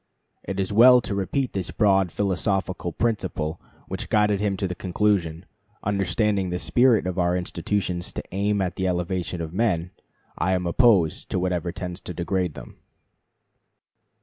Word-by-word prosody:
It 95 0 -4
is 95 +1 -1
well 125 +3 +8
to 110 - -4
repeat 100 +7 -1
the 95 -3 -3
broad 95 -4 +3
philosophical 95 -2 -1
principle 90 -7 -2 0.3
which - - -5
guided 105 -1 +3
him 100 -2 0
to 95 - -1
this 90 -2 -6
conclusion: 90 -3 0 0.4
"Understanding 100 0 0
the 90 - -2
spirit 120 +2 +3
of 90 0 -2
our 90 0 +2
institutions 90 0 -2
to - - -5
aim 100 +1 0
at 90 -1 -4
the 95 - 0
elevation 90 -1 -2
of 80 0 -5
men, 90 -5 0 0.5
I 95 +1 +1
am 90 -1 -2
opposed 95 -4 +3
to - - -1
whatever 90 -1 -1
tends 90 0 -6
to 90 - -8
degrade 90 -2 -1
them." - - -11
95 Hz, 155 wpm, -24 LUFS, 90-105 Hz, 0.5 s, well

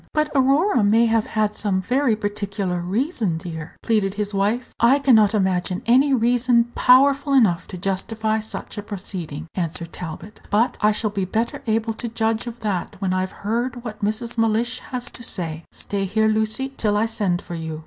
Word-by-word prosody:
"But 305 -1 +1
Aurora 275 - +3
may 220 +3 +4
have 225 -1 +1
had 215 -1 0
some 200 -4 0
very 250 +4 +1
particular 200 -3 -3
reason, 210 - -1
dear?" 160 -2 -7
pleaded 210 -3 +1
his 205 0 -2
wife. 210 +6 0
"I 240 +4 +5
can 275 -2 +3
not 215 -1 +5
imagine 185 -2 0
any 260 +5 +4
reason 240 -1 +3
powerful 275 +3 +4
enough 210 -11 +3
to 185 - -7
justify 215 +4 -1
such 215 0 -6
a - - -3
proceeding," 180 -7 -6
answered 170 -1 -4
Talbot; 180 +4 -8
"but 230 +4 +2
I 210 - +5
shall 215 0 -1
be 195 -2 -1
better 225 +5 -2
able 225 0 0
to 235 +2 -5
judge 225 +1 -1
of 235 0 -7
that 205 -1 -2
when 190 -1 -1
I've 185 +1 -3
heard 240 +3 -1
what 215 -3 -7
Mrs. 230 +3 -2
Mellish 225 +2 +1
has 250 -1 -4
to - - -12
say. 165 -7 -3
Stay 200 -1 -3
here, 220 +3 +1
Lucy, 220 +5 0
till 210 -2 +1
I 215 - +2
send 205 -6 0
for - - -8
you." 160 -2 -5
215 Hz, 185 wpm, -22 LUFS, 195-235 Hz, -, I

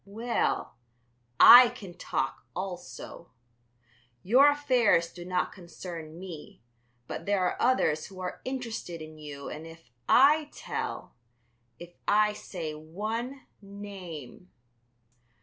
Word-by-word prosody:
Well, 225 - -2 0.6
I 245 0 +11
can 210 -7 -10
talk 135 -6 -3
also. 180 -2 -7 0.9
Your 255 +9 +6
affairs 245 -12 +2
do 175 - -9
not 180 0 -1
concern 170 -3 -9
me, 170 -9 -10 0.4
but - - -7
there 200 -2 +2
are 180 - 0
others 160 -12 +2
who 190 -1 -12
are 180 -1 -5
interested 230 -10 -5
in 155 0 -10
you 145 -2 -8
and 155 +2 -8
if 165 -6 -15 0.2
I 295 +3 +5
tell, - - -5 0.6
if 175 +4 -12
I 210 0 +4
say 170 -6 -6
one 215 - -5 0.2
name.... 190 -6 -9
185 Hz, 115 wpm, -28 LUFS, 165-230 Hz, 0.9 s, I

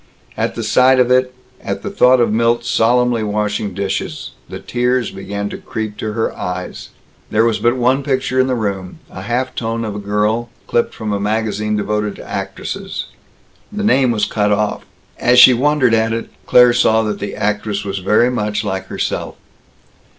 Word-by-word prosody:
At - - -2
the - - -4
sight 130 +1 +4
of 125 0 +3
it, 130 0 +3 0.3
at - - -4
the 200 - -4
thought 130 -9 +4
of 120 -3 +2
Milt 115 +1 +1
solemnly 120 0 +2
washing 105 -1 -2
dishes, 100 0 -3 0.2
the - - -6
tears 125 -1 -1
began 100 +1 -5
to - - -7
creep 110 -1 -5
to 110 -1 -4
her 115 0 -2
eyes. 90 -1 -5 0.4
There 110 +1 +2
was 115 -3 +1
but 120 +3 +2
one 130 +3 +2
picture 130 -2 -1
in 130 - +3
the 130 - 0
room 100 -5 -3
a - - -8
half 120 +5 -2
tone 115 0 -3
of 105 - -4
a - - -4
girl, 105 +3 -1 0.2
clipped 120 - 0
from 110 -2 -3
a 100 - -1
magazine 105 0 -1
devoted 105 0 -2
to - - -11
actresses. - - -5 0.6
The 210 0 -4
name 135 - +3
was 110 -3 +1
cut 105 -1 0
off. 105 0 -1 0.3
As 125 0 +3
she 125 +1 +9
wondered 130 -1 +2
at 115 0 +2
it, 115 - -4 0.2
Claire 125 -1 +6
saw 110 -2 +3
that 105 -1 -3
the 100 - -5
actress 105 0 -2
was 100 -1 -3
very 105 +6 +3
much 105 -4 -2
like 95 0 -3
herself. - - -3
110 Hz, 185 wpm, -17 LUFS, 105-125 Hz, 0.6 s, she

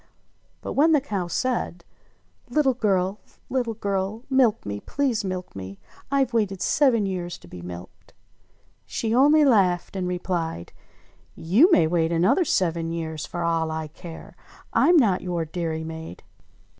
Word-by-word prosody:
But - - -5
when 315 +4 +4
the 300 - +5
cow 200 -10 -3
said: 205 -5 -2 0.6
"Little 270 +1 +2
girl! 195 -4 0 0.3
Little 245 -4 -1
girl! 200 +1 -2
Milk 250 -5 +3
me! 100 0 -4
Please 260 - -1
milk 185 -2 -5
me, 95 0 -7 0.3
Tve 270 -3 +1
waited 205 -5 0
seven 245 -6 +3
years 180 -2 -4
to - - -17
be 85 0 -10
milked 90 +1 -11
■" - - -42 0.7
She 225 -1 -2
only 295 +4 +5
laughed 195 -9 +2
and 185 -2 -2
replied, 175 - -3 0.6
"You 225 - +4
may 170 - +5
wait 165 0 +1
another 180 - +3
seven 165 - 0
years 160 -2 -4
for 175 -1 -4
all 165 -1 0
I 160 -1 -4
care. 165 +1 -11 0.4
I'm 345 0 +5
not 210 - +3
your 175 -2 -2
dairymaid 160 - -5
185 Hz, 145 wpm, -24 LUFS, 165-235 Hz, 0.7 s, the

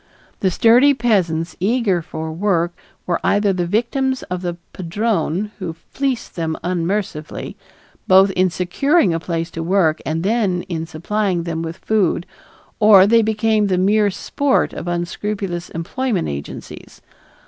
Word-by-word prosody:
The 190 - +2
sturdy 245 +9 +5
peasants 175 -9 0
eager 200 -2 +1
for 160 0 -6
work 175 -1 0 0.3
were 175 -2 0
either 205 -1 +2
the 175 -2 -1
victims 260 +6 0
of 180 - -3
the 175 -2 -3 0.2
padrone 195 +1 -1
who 180 -4 -4
fleeced 265 +9 -4
them 160 -2 -2
unmercifully, 175 -2 -3 0.5
both 190 +1 +6
in 185 0 +2
securing 185 - +1
a 165 - -1
place 165 0 -3
to 165 - -5
work 165 -2 +2
and 160 +1 -2
then 195 -4 +1
in 165 -2 -4
supplying 180 +2 -1
them 165 -1 -3
with 165 0 -5
food, 200 -5 0 0.5
or 210 -3 +8
they 230 +3 +5
became 220 -1 +1
the 185 -2 +1
mere 205 +3 +3
sport 270 +7 0
of - - -6
unscrupulous 175 +1 -3
employment 195 +4 -2
agencies. 70 0 -8
185 Hz, 140 wpm, -19 LUFS, 170-215 Hz, 0.5 s, or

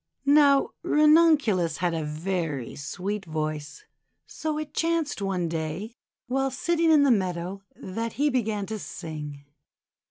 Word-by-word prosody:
Now 285 -1 +5
Ranunculus 300 - +4
had 175 -1 0
a 160 -1 -2
very 155 -3 -3
sweet 195 +8 -4
voice, 155 - -4 0.4
so 310 -1 -4
it 305 -1 -5
chanced 330 -7 0
one 190 -3 -1
day, 165 +7 -4 0.3
while 270 +1 0
sitting 330 +5 +1
in 305 -3 +6
the 280 - +4
meadow, 185 -2 -1
that 225 +4 -5
he 290 +1 +1
began 220 -5 -1
to 220 +1 -5
sing. 150 -6 -7
200 Hz, 130 wpm, -26 LUFS, -, 0.4 s, in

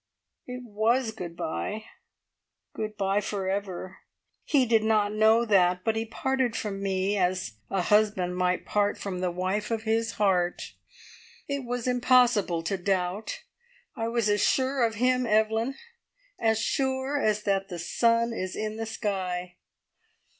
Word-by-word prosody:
"It 250 0 -6
was 225 +2 +1
good 175 -6 -8
bye 210 +7 -3 0.9
good 215 -1 -5
bye 195 +1 +1
for 200 -2 -3
ever. 190 -1 -4 0.4
He 275 -4 +3
did 225 -2 +3
not 210 -2 +2
know 220 +2 +4
that, 180 -4 +3
but 225 - +1
he 225 0 -1
parted 260 +1 -1
from 200 -2 -3
me 195 +1 0
as 180 - -1
a 195 -2 0
husband 205 -3 +2
might 180 0 0 0.3
from 190 -3 -4
the 180 0 0
wife 185 +4 -2
of 225 -1 -2
his 225 0 0
heart. 185 -4 0 0.7
It 280 -2 -3
was 245 0 -3
impossible 245 -8 +3
to 195 +3 -1
doubt. 190 +2 -2 0.5
I 225 - -2
was 230 -2 0
as 205 -1 +2
sure 260 -1 +2
of 225 -1 +1
him, 250 +2 +2
Evelyn 220 +4 +2 0.6
as 220 -1 +2
sure 265 +3 0
as 210 -1 +1
that 195 -1 0
the 175 - -5
sun 230 +7 +1
is 185 -4 -4
in 215 0 -3
the 225 0 -4
sky! 180 -4 -3
215 Hz, 145 wpm, -27 LUFS, 190-230 Hz, 0.9 s, know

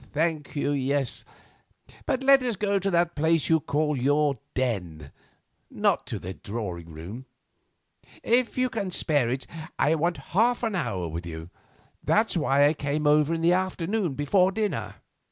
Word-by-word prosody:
"Thank 155 -1 -1
you, 145 0 0
yes, 140 -1 0 0.8
but 270 -2 0
let 275 0 +6
us 245 -3 -1
go 200 0 0
to 195 +1 -1
that 170 -1 +2
place 160 0 +1
you 160 -1 +5
call 150 +1 0
your 145 +2 +1 0.2
den, 90 - -2 0.6
not - - 0
to - - -3
the 95 +2 -6
drawing 90 -6 -6
room. 90 +11 -8 1.0
If 245 +1 +1
you 255 0 +2
can 225 -6 -3
spare 145 -8 +1
it, 130 +2 -2 0.3
I 150 - +3
want 170 +2 0 0.2
half 240 +6 +3
an 225 -2 0
hour 95 - -2
with 85 +2 -6
you. 80 +1 -8 0.5
That's 220 -1 +2
why 145 -3 +3
I 145 - +4
came 145 0 -2
over 150 +1 +4
in 165 -1 -1
the 170 +2 +4
afternoon, 185 -2 -1
before 180 +7 +3
dinner." 155 - -2
150 Hz, 160 wpm, -26 LUFS, 130-185 Hz, 1.0 s, let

